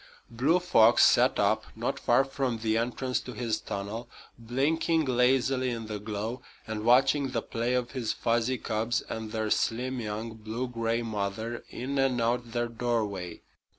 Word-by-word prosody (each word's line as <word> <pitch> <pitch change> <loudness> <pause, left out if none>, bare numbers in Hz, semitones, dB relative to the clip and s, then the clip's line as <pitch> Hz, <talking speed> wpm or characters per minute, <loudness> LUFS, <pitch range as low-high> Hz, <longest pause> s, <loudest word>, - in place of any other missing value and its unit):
Blue 135 +9 +3
Fox 120 -10 +5
sat - - +4
up, - - +2
not - - -2
far 135 - +3
from 135 -3 -2
the 110 0 0
entrance 125 +2 -1
to 125 - -8
his 110 -1 -1
tunnel, 105 +4 -5 0.3
blinking 150 +7 0
lazily 130 +1 +2
in 115 -2 -4
the 105 -1 -5
glow 110 +4 -4 0.2
and 110 -1 -4
watching 135 +4 +4
the - - -1
play 120 +1 -1
of 125 -1 -1
his 120 -5 -2
fuzzy 120 +3 0
cubs 110 +1 -1
and 110 -1 -6
their 110 -1 -2
slim, 125 +3 0
young, 110 0 -4
blue 110 +3 -4
gray 115 -1 -1
mother 110 +2 -3
in 135 +3 -3
and 135 -2 +2
out 120 +1 0
their 120 0 -1
doorway. 110 -7 -2
120 Hz, 160 wpm, -28 LUFS, 110-125 Hz, 0.3 s, Fox